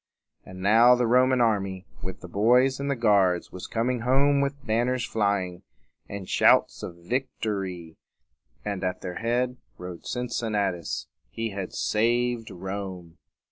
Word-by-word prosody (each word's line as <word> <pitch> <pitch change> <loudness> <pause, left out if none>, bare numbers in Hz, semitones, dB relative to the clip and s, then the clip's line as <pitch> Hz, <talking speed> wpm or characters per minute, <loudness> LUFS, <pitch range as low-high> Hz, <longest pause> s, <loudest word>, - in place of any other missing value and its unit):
And 95 0 -10
now 115 +5 +6
the 125 0 +1
Roman 125 +2 +4
army, 100 -5 0 0.2
with 95 +1 -6
the - - -8
boys 125 +8 +3
and 140 0 -2
the 140 - +1
guards, 100 -7 +2
was 90 - -7
coming 120 +2 -1
home 140 +4 +3
with 140 0 -3
banners 120 +2 +1
flying, 100 -4 -1 0.5
and 100 -2 -6
shouts - - +4
of 85 - -6
vic 125 +11 -2
to 110 - 0
ry; 90 -5 -5 0.7
and 100 -2 -3
at 90 0 -2
their 90 - -5
head 120 +2 0 0.2
rode 90 -1 -8
Cincinnatus. 105 -8 -2 0.2
He 115 -1 -4
had 95 -2 -5
saved 120 +1 +1
Rome. 95 -2 -7
110 Hz, 145 wpm, -26 LUFS, 95-125 Hz, 0.7 s, now